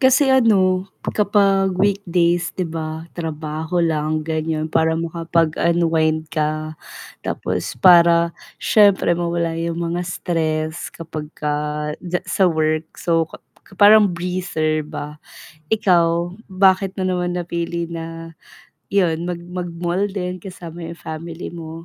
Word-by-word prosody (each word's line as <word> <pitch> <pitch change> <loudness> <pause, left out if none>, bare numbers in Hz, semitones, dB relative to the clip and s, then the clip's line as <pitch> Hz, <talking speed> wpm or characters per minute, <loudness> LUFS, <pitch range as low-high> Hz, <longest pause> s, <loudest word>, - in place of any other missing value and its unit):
Kasi 265 +1 +5
ano, 195 -8 +4 0.2
kapag 200 -2 +2
weekdays 175 -4 +1
'di 185 -3 -3
ba 160 0 -5
trabaho 160 +1 -3
lang 155 -1 0
ganyan, 155 0 -2
para 160 +1 +2
makapag 165 -1 0
unwind 160 -2 +1
ka 155 +1 -2 0.5
tapos - - -2
para 170 -2 +6 0.3
syempre 200 -5 +4
mawala 170 -1 -1
yung 165 0 -2
mga 175 +1 -2
stress 160 -2 -2
kapag 155 -2 -7
ka 150 -1 -2 0.5
ja 180 0 -1
sa 195 - +2
work, 155 -2 +1 0.2
so, 165 -1 +2 0.6
parang 205 -1 +7
breather 170 -3 -1
ba. 150 -1 -7 0.5
Ikaw 175 -4 +2 0.2
bakit 190 +1 +3
mo 190 - -1
naman 180 -1 -1
napili 170 -1 -3
na 165 0 -7 0.6
'yon, 170 -5 +2
mag 175 -1 -3
mag-mall 180 +2 -2
din 180 -2 -4
kasama 175 -3 -8
yung 170 - -11
family 165 +2 -6
mo? 160 -1 -7
170 Hz, 120 wpm, -20 LUFS, 160-180 Hz, 0.6 s, parang